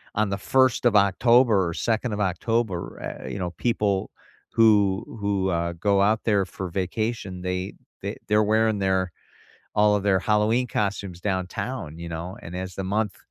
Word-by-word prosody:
on 110 Hz, -1 st, +1 dB
the 100 Hz, -, -1 dB
1st 130 Hz, +3 st, +2 dB
of 120 Hz, -3 st, +4 dB
October 105 Hz, 0 st, +4 dB
or -, -, -4 dB
2nd 115 Hz, +5 st, -1 dB
of 105 Hz, -, -3 dB
October, 100 Hz, 0 st, -1 dB
eh, 65 Hz, -, -6 dB
e -, -, -5 dB
you -, -, -4 dB
know, 90 Hz, -2 st, -2 dB
people 105 Hz, -5 st, 0 dB, 0.4 s
who 105 Hz, -3 st, +4 dB, 0.2 s
who, 100 Hz, -2 st, 0 dB
uh, 85 Hz, 0 st, 0 dB
go 100 Hz, +3 st, +1 dB
out 110 Hz, +2 st, +3 dB
there 105 Hz, -3 st, +3 dB
for 95 Hz, 0 st, -6 dB
vacation 95 Hz, +1 st, -3 dB
they 90 Hz, +1 st, -3 dB, 0.3 s
th -, -, -4 dB
they're 105 Hz, 0 st, +4 dB
wearing 110 Hz, 0 st, +2 dB
their, 95 Hz, -2 st, +1 dB, 0.7 s
all 105 Hz, 0 st, +5 dB
of 100 Hz, -, -2 dB
their 100 Hz, -2 st, +3 dB
Halloween 110 Hz, +5 st, +2 dB
costumes 100 Hz, -5 st, -2 dB
downtown, 95 Hz, -, -3 dB
you 85 Hz, 0 st, -6 dB
know, 85 Hz, +4 st, -6 dB
and 85 Hz, +2 st, -7 dB
as 95 Hz, 0 st, -5 dB
the 95 Hz, -, -3 dB
month 105 Hz, +1 st, -1 dB
100 Hz, 175 wpm, -25 LUFS, 95-110 Hz, 0.7 s, all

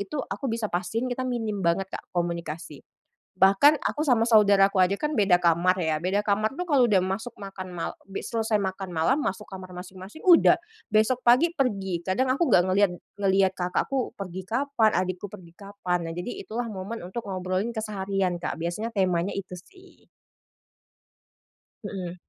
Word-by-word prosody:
itu 200 Hz, +9 st, -5 dB
aku 275 Hz, -, -4 dB
bisa 225 Hz, -1 st, -1 dB
pastiin 185 Hz, +8 st, -1 dB
kita 255 Hz, -, -3 dB
minim 225 Hz, -4 st, -2 dB
banget, 170 Hz, +3 st, +1 dB
Kak, -, -, -7 dB
komunikasi. 170 Hz, -4 st, -3 dB, 0.6 s
Bahkan 195 Hz, +11 st, +5 dB
aku -, -, -2 dB
sama 240 Hz, -4 st, +4 dB
saudara 200 Hz, -3 st, +6 dB
aku 195 Hz, -, 0 dB
aja 185 Hz, +2 st, +4 dB
kan 300 Hz, -, -1 dB
beda 195 Hz, -4 st, +5 dB
kamar 170 Hz, +2 st, +3 dB
ya. 155 Hz, -1 st, 0 dB
Beda 190 Hz, +5 st, 0 dB
kamar 215 Hz, +4 st, 0 dB
itu 360 Hz, -, -2 dB
kalau 270 Hz, -6 st, +4 dB
udah 195 Hz, -3 st, +4 dB
masuk 210 Hz, +5 st, -4 dB
makan 195 Hz, -2 st, -8 dB
mal 165 Hz, -, -3 dB, 0.2 s
be 195 Hz, -, -6 dB
selesai 225 Hz, -1 st, -1 dB
makan 190 Hz, -1 st, -4 dB
malam 240 Hz, -, +2 dB
masuk 210 Hz, -7 st, -2 dB
kamar 185 Hz, -1 st, -9 dB
masing-masing, 185 Hz, -, -10 dB
udah. 355 Hz, -3 st, +7 dB, 0.4 s
Besok 220 Hz, +4 st, +3 dB
pagi 255 Hz, +8 st, +5 dB
pergi. 195 Hz, -, -1 dB
Kadang 255 Hz, +7 st, +1 dB
aku 310 Hz, +5 st, +1 dB
nggak 175 Hz, -, +5 dB
ngelihat 195 Hz, 0 st, +3 dB, 0.3 s
ngelihat 195 Hz, -1 st, +3 dB
kakakku 190 Hz, +9 st, -1 dB
pergi 190 Hz, -1 st, -6 dB
kapan, 235 Hz, -1 st, +1 dB
adik 185 Hz, 0 st, 0 dB
aku 205 Hz, -, -6 dB
pergi 170 Hz, -2 st, -12 dB
kapan. 200 Hz, -3 st, -3 dB
Nah, -, -, -6 dB
jadi 180 Hz, +7 st, -4 dB
itulah 235 Hz, +2 st, -4 dB
momen 200 Hz, +3 st, -6 dB
untuk 205 Hz, +5 st, -6 dB
ngobrolin 185 Hz, +4 st, -2 dB
keseharian, 195 Hz, -4 st, -2 dB
Kak. -, -, -3 dB
Biasanya 175 Hz, +8 st, -3 dB
temanya 185 Hz, -1 st, +1 dB
itu 195 Hz, -2 st, -6 dB
sih. 375 Hz, -, -20 dB, 1.8 s
Mhm. 180 Hz, -3 st, -5 dB
195 Hz, 170 wpm, -26 LUFS, 185-230 Hz, 1.8 s, udah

